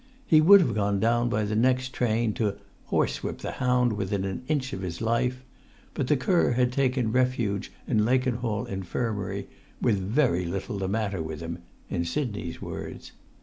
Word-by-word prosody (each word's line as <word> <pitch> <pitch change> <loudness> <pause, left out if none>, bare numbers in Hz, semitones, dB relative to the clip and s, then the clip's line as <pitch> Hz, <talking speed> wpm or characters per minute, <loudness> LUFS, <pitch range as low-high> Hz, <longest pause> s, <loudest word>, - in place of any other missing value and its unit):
He 155 -9 +6
would 195 +5 +9
have 125 -10 +1
gone 100 -1 +1
down 120 +2 +2
by 105 -2 0
the 105 +1 -2
next 130 +2 +2
train 115 -2 +1
to 105 -3 -1 0.3
"horsewhip - - -1
the - - -5
hound 125 -2 +3
within 100 -1 -2
an 95 +3 -3
inch 140 -4 -1
of 95 - -4
his 85 -3 -4
life," 125 +3 0 0.5
but 135 - -2
the 150 - +3
cur 150 +2 +2
had 125 0 +2
taken 125 -3 +1
refuge 125 -5 0 0.2
in 110 -4 +2
Lakenhall 120 -3 0
Infirmary, 100 +3 -3 0.3
"with 105 -4 +2
very 95 - +1
little 95 +3 -4
the 95 - -1
matter 100 -3 -1
with 80 -1 -5
him," 85 +1 -5 0.3
in 85 - -1
Sidney's 105 - -3
words. - - -7
115 Hz, 170 wpm, -27 LUFS, 100-125 Hz, 0.5 s, would